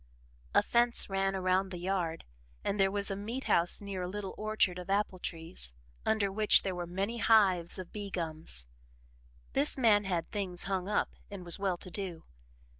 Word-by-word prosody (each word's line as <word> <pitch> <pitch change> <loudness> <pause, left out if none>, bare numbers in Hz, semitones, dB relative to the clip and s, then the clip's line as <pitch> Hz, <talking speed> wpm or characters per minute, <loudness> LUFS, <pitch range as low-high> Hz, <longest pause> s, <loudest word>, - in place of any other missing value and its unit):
A - - +6
fence 240 -3 +3
ran 195 0 +1
around 185 +1 +1
the 180 - -6
yard 175 -2 -2 0.4
and 200 - -1
there 195 0 +5
was 200 +1 +1
a - - -1
meat 225 +7 -4
house 170 +4 +2
near 200 -2 -4
a 180 - -2
little 200 0 -5
orchard 215 -4 +1
of 180 - -9
apple 195 -2 0
trees, 165 - -6 0.3
under 215 -3 +2
which 210 +1 +5
were 180 -2 -2
many 195 +6 -2
hives 190 -7 +4
of 185 -2 -7
bee 205 -1 -5
gums. 160 - -4 0.9
This 280 +2 +3
man 215 -5 +4
had 175 -3 -2
things 185 -4 -3
"hung 190 -1 -2
up" 210 - 0 0.2
and 195 -3 -8
was 170 +1 +2
well 190 -3 0
to 180 - -8
do. 180 -5 -4
195 Hz, 180 wpm, -31 LUFS, 180-205 Hz, 0.9 s, A